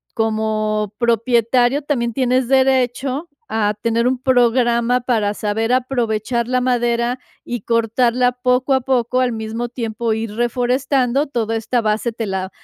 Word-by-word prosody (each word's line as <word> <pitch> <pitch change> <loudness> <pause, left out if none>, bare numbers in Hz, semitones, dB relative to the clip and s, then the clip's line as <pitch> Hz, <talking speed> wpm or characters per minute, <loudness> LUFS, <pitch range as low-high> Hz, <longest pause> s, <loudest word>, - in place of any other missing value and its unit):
como 215 -1 -1
propietario 240 +3 +2
también 235 -5 -1
tienes 255 0 +1
derecho 265 +3 +1 0.2
a 210 -1 0
tener 230 +1 +1
un 255 0 +1
programa 245 -1 +2
para 220 -4 0
saber 220 +3 -1
aprovechar 235 -2 -1
la 255 0 +1
madera 240 0 0 0.3
y 240 -3 -4
cortarla 235 +2 +1
poco 250 +2 +1
a 265 - +2
poco, 255 0 0
al 250 -1 +1
mismo 225 +2 -4
tiempo 230 -1 -3
ir 220 -1 -4
reforestando, 250 +3 0
toda 225 -4 -2
esta 235 +2 -1
base 220 +2 0
te 225 0 -4
la 190 -1 -3
240 Hz, 140 wpm, -19 LUFS, 225-255 Hz, 0.3 s, propietario